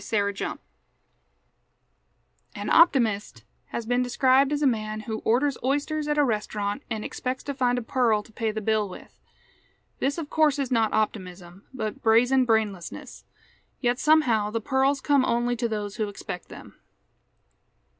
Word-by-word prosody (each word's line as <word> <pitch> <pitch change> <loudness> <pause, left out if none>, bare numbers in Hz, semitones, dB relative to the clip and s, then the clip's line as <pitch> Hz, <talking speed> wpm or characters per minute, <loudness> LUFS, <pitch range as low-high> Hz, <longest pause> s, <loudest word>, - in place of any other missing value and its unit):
_ - - -10
HERE'S 200 -2 0
HOPIN' - - -3 2.0
An - - -4
optimist 240 - +3 0.2
has 235 - -5
been 245 +2 +1
described 260 +2 +3
as 295 0 0
a - - +4
man 215 -4 -1
who 220 0 -4
orders 265 +4 +1
oysters 290 +3 -1
at 295 0 0
a 295 - +5
restaurant 210 -2 -2
and 220 -2 -3
expects 255 0 -4
to 280 - -4
find 250 -2 +1
a 245 - -3
pearl 230 -4 +1
to 220 - -19
pay 225 0 -2
the 215 0 -3
bill 215 -1 0
with. 180 - -13 0.8
This 275 +4 0
of 325 -3 -4
course 310 -2 +3
is 275 -3 -2
not 225 -3 +2
optimism, 185 -3 -3
but 220 -5 -5
brazen 245 +3 +4
brainlessness. 215 -6 -2 0.5
Yet 245 -1 0
somehow 250 -9 +3
the 230 +2 -2
pearls 265 +4 +1
come 280 -1 +3
only 240 0 +1
to 235 0 -2
those 210 -1 -4
who 215 -2 -1
expect 200 - -8
them. - - -13
235 Hz, 160 wpm, -25 LUFS, 215-265 Hz, 2.0 s, a